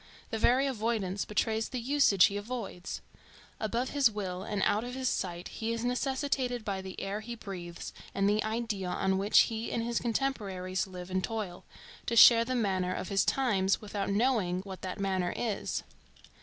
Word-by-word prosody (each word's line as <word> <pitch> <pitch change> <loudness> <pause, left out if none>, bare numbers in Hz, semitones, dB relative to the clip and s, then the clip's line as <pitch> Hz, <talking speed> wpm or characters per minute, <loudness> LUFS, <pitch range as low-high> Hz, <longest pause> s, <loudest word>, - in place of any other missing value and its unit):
The 225 - -2
very 255 +5 +4
avoidance 220 -6 -1
betrays 220 +1 0
the 255 - -3
usage 245 -6 +5
he 200 - 0
avoids. 205 -4 -5 0.6
Above 235 +4 -1
his 280 -4 +4
will 190 -4 -4
and 205 -1 -2
out 210 +2 +2
of 245 +1 -5
his 260 -1 -1
sight 175 -1 -3
he 225 +1 -3
is 230 +1 -3
necessitated 250 -1 -1
by 195 -2 -2
the 190 0 -7
air 195 +2 -3
he 235 +2 -6
breathes 180 -6 -7 0.2
and 195 0 +2
the 210 +1 +2
idea 220 -4 -2
on 190 +1 +1
which 205 +2 +6
he 225 0 -2
and 230 - -1
his 235 0 0
contemporaries 200 -7 -1
live 180 -1 -8
and 185 0 0
toil, 210 -5 -4 0.4
to 235 - 0
share 230 +1 +9
the 255 +2 -2
manner 190 -5 0
of 185 - -4
his 195 -1 +3
times, 200 -8 +2
without 205 -2 -3
knowing 200 -4 +1
what 190 -1 -9
that 185 0 -5
manner 190 -2 0
is. 220 -4 -2
210 Hz, 180 wpm, -30 LUFS, 190-235 Hz, 0.6 s, share